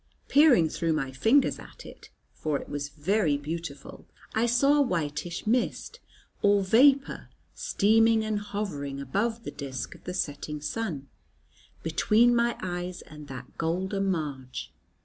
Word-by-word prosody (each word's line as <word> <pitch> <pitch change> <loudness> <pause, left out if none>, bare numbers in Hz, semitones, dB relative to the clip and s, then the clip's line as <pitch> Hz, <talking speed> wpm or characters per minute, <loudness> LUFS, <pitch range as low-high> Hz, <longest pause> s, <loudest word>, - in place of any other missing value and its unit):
Peering 280 - +6
through 165 +1 -1
my 135 -4 -2
fingers 225 - +3
at - - -13
it, - - -13 0.2
for 150 -2 -2
it - - -9
was 145 0 -4
very 160 0 +1
beautiful, 150 -1 -7 0.3
I 225 +2 +2
saw 275 +5 +4
a - - +6
whitish 170 - -2
mist 250 - -1 0.4
or 205 -1 +4
vapour 270 +8 +3 0.2
steaming 220 +2 +3
and 215 -1 -1
hovering 195 -10 -4
above 220 - -2
the - - -5
disk 130 -3 -6
of - - -18
the 180 - -4
setting 150 -3 -3
sun, 150 -3 -4 0.8
between 215 +9 +3
my 235 0 +1
eyes 180 0 -4
and 150 -1 -12
that 130 -2 -10
golden 190 +4 -1
marge. 130 - -4
180 Hz, 140 wpm, -27 LUFS, 145-225 Hz, 0.8 s, Peering